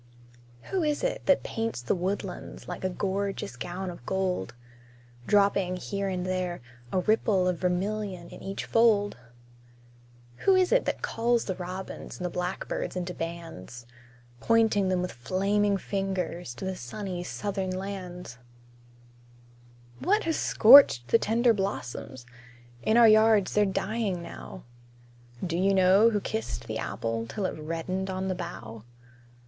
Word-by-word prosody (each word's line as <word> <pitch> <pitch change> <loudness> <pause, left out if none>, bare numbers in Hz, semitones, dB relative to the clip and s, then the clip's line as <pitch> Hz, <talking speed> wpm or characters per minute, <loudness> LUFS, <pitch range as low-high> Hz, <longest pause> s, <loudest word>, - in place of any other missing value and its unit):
Who 380 - +1
is 300 +3 0
it - - -2
that 280 - +4
paints 225 - -3
the 120 - 0
woodlands 190 0 -4
Like 180 - -6
a 185 - +1
gorgeous 195 -5 -3
gown 180 +8 -5
of 170 - -12
gold; 185 - -1 0.7
Dropping, 200 -3 +3
here 200 +2 -3
and 180 -1 -2
there, 185 -1 -2 0.3
a 185 - +1
ripple 200 -2 +2
Of 180 -2 0
vermilion 185 0 -2
in - - -11
each 195 - -5
fold? 215 - +3 1.2
Who 385 - +4
is 370 -1 +3
it - - +3
that - - -2
calls 235 0 +1
the 190 - -2
robins 185 +1 -7
And 180 - -5
the 175 - -2
blackbirds 180 +1 -3
into 180 0 -3
bands; 165 - -7 0.5
Pointing 220 - +3
them 180 -1 +1
with 180 - -3
flaming 200 +9 +1
fingers, 190 -8 -3
To 190 - -6
the 190 0 -2
sunny, 180 - -5
Southern 195 0 -3
lands? 185 -7 -6 1.6
What 415 +5 +2
has 325 -1 0
scorched 225 - +7
the 230 - +5
tender 230 +2 +3
blossoms? 130 - -4 0.6
In 220 - +2
our 235 -1 +8
yards 215 -2 +5
they're 210 0 +4
dying 195 -2 -2
now. 170 - -9 0.8
Do 170 -1 -1
you 195 +1 +3
know 190 +4 +6
who 210 -2 0
kissed 110 - -4
the - - -4
apple 115 0 -3
Till 205 - -3
it 180 - -3
reddened 165 +5 -3
on 190 0 -2
the - - +1
bough? 120 - -7
190 Hz, 145 wpm, -28 LUFS, 175-210 Hz, 1.6 s, our